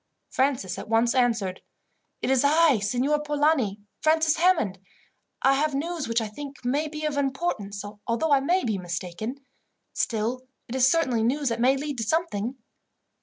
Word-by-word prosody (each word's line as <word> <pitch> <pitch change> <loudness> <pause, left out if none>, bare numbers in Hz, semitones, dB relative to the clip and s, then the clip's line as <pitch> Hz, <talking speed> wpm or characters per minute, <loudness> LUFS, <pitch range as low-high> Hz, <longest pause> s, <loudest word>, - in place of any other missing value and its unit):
Francis 255 -9 0
at - - -8
once 230 +1 +3
answered: 230 -8 +1 0.6
"It - - +1
is 265 -1 +3
I, 300 -3 +4
Signor 250 +8 +1
Polani, 295 -8 +1 0.2
Francis 315 0 +3
Hammond. 320 - +2 0.6
I 270 - +5
have 290 +1 +1
news 325 +2 -2
which 230 +1 +1
I 220 - -2
think 275 +5 -9
may 285 +5 +1
be 305 0 -5
of 300 -2 -1
importance, 265 - -2 0.2
although 290 +7 0
I 280 - +6
may 350 +7 +1
be 215 -4 -1
mistaken. 180 +9 -5 0.5
Still, 230 +3 -1 0.3
it 235 - -7
is 260 0 +4
certainly 265 -7 +2
news 270 +4 +1
that 230 0 -2
may 265 +2 +4
lead 285 -2 -4
to - - 0
something." 250 -4 -1
265 Hz, 165 wpm, -26 LUFS, 225-300 Hz, 0.6 s, I